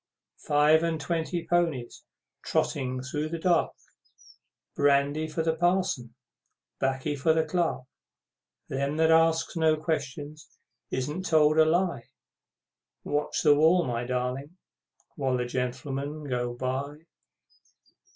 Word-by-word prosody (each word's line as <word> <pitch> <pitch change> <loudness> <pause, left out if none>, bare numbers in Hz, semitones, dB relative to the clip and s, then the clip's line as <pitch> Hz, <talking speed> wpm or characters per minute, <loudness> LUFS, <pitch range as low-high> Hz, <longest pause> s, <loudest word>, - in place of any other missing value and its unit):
Five 150 +2 +5
and 165 -1 -1
twenty 165 +3 -2
ponies, 165 -9 -1 0.4
Trotting 130 -2 -1
through 150 +2 -3
the 165 - -3
dark, 170 0 +2 1.0
Brandy 145 +2 +2
for 160 +1 -2
the 160 0 +1
Parson, 175 -8 0 0.6
'Baccy 135 +2 -1
for 150 +3 +2
the 160 0 +1
Clerk; 160 -5 -1 0.8
Them 140 +3 -2
that 160 0 +4
asks 165 +1 +3
no 160 -1 +3
questions 155 -1 -4 0.4
isn't 150 +8 -3
told 155 -1 +4
a 160 - +7
lie, 170 -5 0 0.9
Watch 145 0 -1
the 150 - +7
wall, 160 +4 +4
my 120 -1 -2
darling, 125 +6 -3 0.6
while 135 -3 0
the 125 - -1
Gentlemen 135 +4 -4
bo 120 -2 -2
by! 140 +5 -4
150 Hz, 115 wpm, -27 LUFS, 135-160 Hz, 1.0 s, a